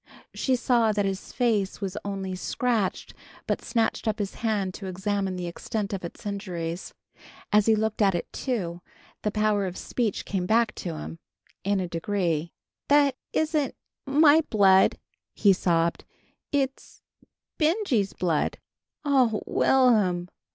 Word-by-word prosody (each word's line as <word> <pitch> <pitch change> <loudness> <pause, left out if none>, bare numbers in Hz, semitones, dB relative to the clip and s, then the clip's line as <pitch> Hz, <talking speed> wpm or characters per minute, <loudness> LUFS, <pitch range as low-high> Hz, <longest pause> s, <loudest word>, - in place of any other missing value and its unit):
She 260 - +1
saw 240 -3 +3
that 205 -1 +1
his 195 0 -4
face 220 -6 0
was 195 -2 -4
only 195 -2 -4
scratched, 215 +2 -1 0.3
but - - -1
snatched 230 -1 -1
up 220 0 +1
his 205 -3 -3
hand 205 -5 -1
to 195 - -7
examine 195 +1 -2
the 180 -1 -4
extent 205 +4 -4
of 190 - -4
its 170 - -8
injuries. 180 -4 -4 0.6
As 210 0 +5
he 220 - +6
looked 220 0 -1
at 195 -3 +4
it 170 - -2
too, 180 -10 -3 0.4
the 210 - 0
power 210 -2 +1
of 180 - -6
speech 230 -5 -2
came 185 -3 -2
back 225 +1 +3
to 170 -4 -4
him, 80 +2 -7 0.4
in 200 0 +1
a 185 - -2
degree. 170 -2 -1 0.4
"That 285 -2 +4 0.2
isn't 305 -4 0 0.3
m 275 +3 +2
my 310 0 +7
b - - -19
blood!" 195 -3 +5 0.4
he 200 -2 +5
sobbed. 170 -2 +1 0.5
"It's 270 -2 -2 0.6
B 305 - +4
Benjy's 310 - +1
blood!" 165 -5 0 0.5
"Oh, 255 -6 +3
Will'm!" 210 -9 +3
205 Hz, 150 wpm, -26 LUFS, 185-235 Hz, 0.6 s, my